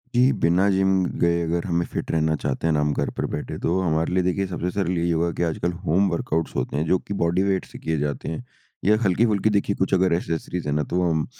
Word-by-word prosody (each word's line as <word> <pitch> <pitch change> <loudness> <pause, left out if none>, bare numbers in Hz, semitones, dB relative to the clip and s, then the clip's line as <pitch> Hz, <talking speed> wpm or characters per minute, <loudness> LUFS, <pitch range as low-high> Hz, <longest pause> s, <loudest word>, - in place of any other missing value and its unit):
जी। 125 +2 +5
बिना 90 +4 +4
जिम 95 -1 +2 0.2
गए 85 0 +3
अगर 85 +1 -1
हमें 85 -1 0
फिट - - -3
रहना 80 -1 +1
चाहते 70 +1 -2
हैं 80 - +2
ना 75 - +2
हम 75 0 +1
घर - - -1
पर - - 0
बैठे - - -4
तो 90 +3 +2
हमारे 80 -1 0
लिए 90 0 +2
देखिए 95 +2 0
सबसे 90 0 -3
सरल 90 -3 -1
यही 85 +1 +1
होगा 85 +1 +1
कि - - +2
आजकल 85 +1 -1
होम 95 +4 +3
वर्कआउट्स 80 -2 -2
होते - - -2
हैं 75 - 0
जो 90 +3 +3
कि 100 - -6
बॉडी 85 +3 +2
वेट 95 -1 0
से - - -12
किए 80 -1 -1
जाते 70 -2 -3
हैं। 80 - -5 0.4
या 105 +2 +5
हल्की-फुल्की 105 +2 +2
देखिए 100 -1 +1
कुछ 95 - 0
अगर 95 -1 +3
एक्सेसरीज़ 85 0 -3
है 75 - 0
ना 75 - +1
तो 90 - +1
हम 80 -4 +1
85 Hz, 250 wpm, -23 LUFS, 80-95 Hz, 0.4 s, जी